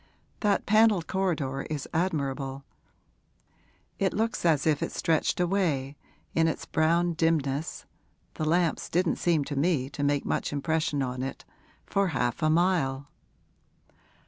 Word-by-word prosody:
That 205 -2 +1
panelled 215 -4 +4
corridor 155 -9 -1
is 150 -3 -4
admirable; 140 -5 -2 1.3
it 190 -2 +1
looks 225 -3 -1
as 155 -4 +3
if 155 -2 +2
it - - -2
stretched 165 0 0
away, 170 -7 0 0.4
in 165 0 +3
its 160 - -2
brown 170 +2 +2
dimness 155 -3 -1 0.5
(the 155 - -3
lamps 170 +1 +1
didn't 175 0 +1
seem 165 -4 +2
to 145 - -5
me 140 -3 +1
to 145 - -6
make 145 0 +1
much - - -1
impression 150 -1 0
on 125 0 -3
it), 135 +1 -5 0.4
for 200 0 +1
half 125 -4 -1
a 155 - +3
mile.' 155 -5 +1
160 Hz, 135 wpm, -28 LUFS, 140-175 Hz, 1.3 s, panelled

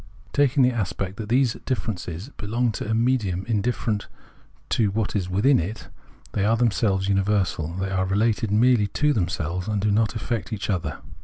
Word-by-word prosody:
Taking 140 -1 +3
the 125 - +4
aspect 95 -3 -3
that 110 -1 -6
these 125 -1 +3
differences 105 - -3
belong 115 0 -1
to 105 - -5
a - - +1
"medium" 110 -6 +1
indifferent 110 -1 -1 0.6
to 110 -3 +2
what 105 +1 -2
is 95 -3 -1
within 110 +9 +4
it, 100 +7 -5 0.4
they 100 - 0
are 110 +3 +3
themselves 100 -4 +1
imiversal, 95 -5 0
they 95 0 -2
are 95 0 +1
related 110 +3 +1
merely 110 0 +4
to 150 +8 +1
themselves 90 - -2
and 105 -1 0
do 105 +1 +1
not 110 +2 +1
affect 110 -1 -3
each 105 -1 -2
other. 80 -6 -3
105 Hz, 170 wpm, -24 LUFS, 95-115 Hz, 0.6 s, the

